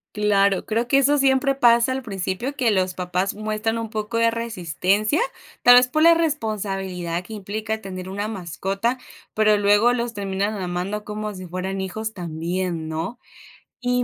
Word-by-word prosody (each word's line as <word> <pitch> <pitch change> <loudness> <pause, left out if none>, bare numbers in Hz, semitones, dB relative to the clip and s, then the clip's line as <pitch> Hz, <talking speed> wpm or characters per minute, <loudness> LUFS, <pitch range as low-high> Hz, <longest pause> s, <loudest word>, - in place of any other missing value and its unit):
Claro, 200 -2 +2
creo 230 +2 -1
que 275 - +4
eso 285 +1 +4
siempre 270 0 +3
pasa 240 -1 +4
al 265 +1 -2
principio, 205 +5 -3
que 245 -4 +2
los 185 -2 0
papás 180 +2 -1
muestran 215 +1 -2
un 225 -1 -5
poco 215 +1 -3
de 230 0 +3
resistencia, 215 - 0 0.4
tal 245 0 +8
vez 250 0 +6
por 310 +5 0
la 335 +1 +7
responsabilidad 195 - -2
que 220 - -10
implica 215 +2 -4
tener 185 -2 -7
una 205 +2 -3
mascota, 195 +4 -2 0.4
pero 215 -1 +4
luego 205 +4 +4
los 235 -2 -2
terminan 200 +1 -2
amando 185 +4 -3
como 210 -1 -5
si 185 0 -8
fueran 185 +2 -4
hijos 220 +4 -4
también, 170 -1 -3
¿no? 165 +10 -4 0.6
Y 250 0 +1
210 Hz, 165 wpm, -23 LUFS, 185-235 Hz, 0.6 s, tal